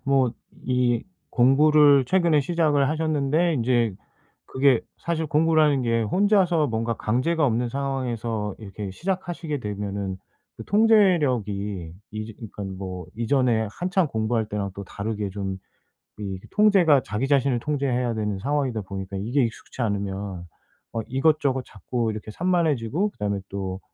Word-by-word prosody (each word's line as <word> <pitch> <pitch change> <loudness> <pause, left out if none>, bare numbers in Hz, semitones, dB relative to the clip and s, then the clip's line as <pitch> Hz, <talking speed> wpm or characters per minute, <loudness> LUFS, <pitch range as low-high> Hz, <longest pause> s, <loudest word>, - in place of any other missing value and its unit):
뭐 135 -3 +3 0.4
이 125 -2 +2 0.3
공부를 145 +2 +5
최근에 170 -4 +3
시작을 150 -3 +2
하셨는데 155 +1 +1
인제 120 -5 +1 0.5
그게 130 -2 +3 0.2
사실 160 -2 -2
공부라는 155 -2 +3
게 115 -1 +1
혼자서 180 - +3
뭔가 115 0 -1
강제가 145 +10 0
없는 120 -2 +1
상황에서 120 -6 -2
이렇게 100 -1 -7
시작하시게 175 - -3
되면은 100 -3 -4 0.4
그 - - -8
통제력이 125 - +2 0.2
이제 110 +1 -5
그러니까 105 -2 -9 0.2
뭐 90 -3 -6
이전에 115 -1 +2
한창 185 - 0
공부할 110 -2 -1
때랑 100 -2 -3
또 100 - -7
다르게 105 +1 -4
좀 95 -1 -4 0.6
이 95 -2 -4
통제가 195 -9 +5
자기 105 +7 -2
자신을 135 -3 +2
통제해야 130 -4 0
되는 105 -3 -2
상황이다 130 -2 -1
보니까 95 0 -6
이게 120 +8 0
익숙지 115 +3 -7
않으면 100 -4 -2 0.5
어 115 - -2
이것저것 135 -1 +1
자꾸 115 +4 -3
이렇게 110 0 -7
산만해지고 165 - 0
그다음에 100 - -3
또 95 -1 -4
125 Hz, 320 characters per minute, -24 LUFS, 105-150 Hz, 0.6 s, 공부를